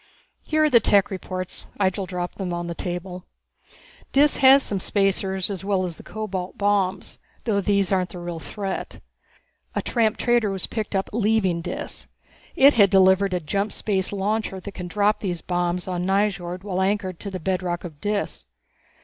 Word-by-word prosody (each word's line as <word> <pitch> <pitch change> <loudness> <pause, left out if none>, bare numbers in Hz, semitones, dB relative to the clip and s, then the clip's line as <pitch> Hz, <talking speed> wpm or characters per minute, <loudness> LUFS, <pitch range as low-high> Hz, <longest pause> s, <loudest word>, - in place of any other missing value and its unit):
"Here 310 0 +1
are 305 - +4
the 235 - +7
tech 205 -2 +3
reports." 185 -1 -4
Ihjel 190 0 0
dropped 180 0 -5
them 185 -2 -2
on 175 0 -3
the 170 - -4
table. 180 +1 -5 0.9
"Dis 290 +2 +4
has 270 0 +7
some 200 - -2
spacers 190 0 0
as 195 -1 -5
well 195 -2 +1
as 170 -3 -6
the - - -11
cobalt 195 -4 -5
bombs 200 -2 0 0.2
though 205 -4 +1
these 200 -1 +1
aren't 185 -2 +1
the - - -9
real 175 -1 -5
threat. 195 +5 -5 0.8
A - - +1
tramp 225 -3 +1
trader 240 -3 +2
was 195 -1 -2
picked 215 -2 -4
up 195 - 0
leaving 210 -6 +1
Dis. - - -6 0.5
It 280 -3 +7
had 200 -4 +5
delivered 190 0 +4
a - - 0
jump 200 +6 -2
space 190 -3 -1
launcher 205 0 -1
that 200 +2 -8
can 180 -2 -7
drop 205 +3 +1
those 175 -4 -3
bombs 175 0 -1
on 180 -1 -2
Nyjord 190 -2 0
while 190 -2 -2
anchored 190 -2 -1
to 200 - -5
the 190 -1 -5
bedrock 180 -1 -2
of 155 -5 -9
Dis. 205 - -2
190 Hz, 175 wpm, -24 LUFS, 180-205 Hz, 0.9 s, the